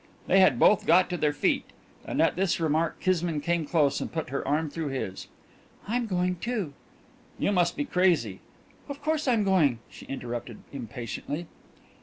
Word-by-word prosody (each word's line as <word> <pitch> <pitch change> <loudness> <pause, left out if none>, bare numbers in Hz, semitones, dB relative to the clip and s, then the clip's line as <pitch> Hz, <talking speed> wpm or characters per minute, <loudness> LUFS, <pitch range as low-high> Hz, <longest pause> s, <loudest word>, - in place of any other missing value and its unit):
They 190 - +4
had 185 -10 +5
both 205 - +4
got 180 +2 +5
to 175 - -1
their 150 -2 +2
feet, 145 - +1 0.4
and - - -3
at - - +2
this 185 -1 +1
remark 160 0 0
Kismine 175 -4 0
came 165 +1 -1
close 145 -4 +2
and - - -4
put 160 -5 -4
her 140 - -2
arm 155 +3 +1
through 160 +1 -4
his. 130 -9 -4 0.6
"I'm 235 +2 0
going, 180 -2 0
too." 210 -7 -3 0.6
"You - - +1
must 175 -3 +2
be 290 - -1
crazy 170 - +2 0.2
" - - -29
"Of 280 0 -6
course 310 -1 -1
I'm 230 -4 +3
going," 170 -11 +3
she - - -12
interrupted 120 -3 -5 0.2
impatiently. 125 - -5
165 Hz, 175 wpm, -27 LUFS, 140-185 Hz, 0.6 s, had